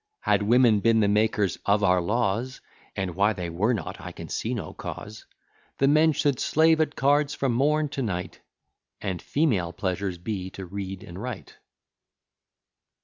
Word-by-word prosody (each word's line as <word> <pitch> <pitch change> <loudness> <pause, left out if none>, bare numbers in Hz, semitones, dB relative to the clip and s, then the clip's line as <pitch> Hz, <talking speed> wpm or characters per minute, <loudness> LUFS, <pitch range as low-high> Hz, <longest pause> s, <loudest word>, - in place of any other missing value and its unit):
Had - - +2
women 115 0 +4
been 115 +2 +3
the 105 - +3
makers 105 -3 +1
of 105 +1 +2
our 90 -2 +4
laws, 115 +6 -1 0.4
(And 95 -3 -2
why 100 +4 +2
they 90 -4 -5
were 100 +8 +1
not, 115 - -4
I - - -7
can - - -9
see 120 +3 -2
no 90 -9 -6
cause,) 105 +1 -8 0.5
The 135 - +3
men 155 +3 +5
should 140 -2 0
slave 160 +1 +3
at 150 -1 -1
cards 145 +1 +2
from 135 -3 0
morn 150 +5 +2
to 140 -1 -4
night 90 -7 -4 0.6
And 95 -4 -4
female 110 - 0
pleasures 95 0 -3
be 95 +1 -4
to 95 - -6
read 95 0 -6
and 85 +3 -9
write. 125 -4 -7
105 Hz, 165 wpm, -26 LUFS, 95-130 Hz, 0.6 s, men